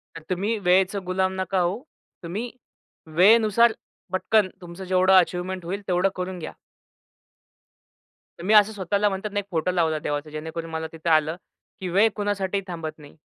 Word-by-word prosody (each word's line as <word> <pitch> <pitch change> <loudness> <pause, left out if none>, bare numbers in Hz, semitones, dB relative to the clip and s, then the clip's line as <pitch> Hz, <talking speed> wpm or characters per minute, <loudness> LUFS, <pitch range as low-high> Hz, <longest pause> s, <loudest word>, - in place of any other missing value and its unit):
तर 165 - -8
तुम्ही 200 +5 -1
वेळेचं 190 +2 +3
गुलाम 185 +1 0
नका 190 0 0
होऊ. 180 +7 0 0.4
तुम्ही 210 +8 -4 0.6
वेळेनुसार 220 +4 +5 0.4
पटकन 200 +1 +2
तुमचं 175 +1 -9
जेवढं 185 +1 +3
अचिव्हमेंट 180 0 -2
होईल 195 +4 -4
तेवढं 180 +2 +2
करून 185 0 -4
घ्या. 155 - -7 1.9
तर - - -8
मी 210 +4 +2
असं 210 0 +6
स्वतःला 200 +1 0
म्हणतात 195 +2 -4
ना 205 - -1
एक 200 - -6
फोटो 170 +1 0
लावला 160 -3 +1
देवाचा, 145 +1 -3
जेणेकरून 160 +2 -6
मला 160 0 -3
तिथं 165 +1 -4
आलं 155 +1 +3 0.4
की 185 - -4
वेळ 200 +5 +4
कुणासाठीही 200 -2 -1
थांबत 165 -3 -5
नाही. 145 -1 -15
185 Hz, 160 wpm, -24 LUFS, 170-200 Hz, 1.9 s, असं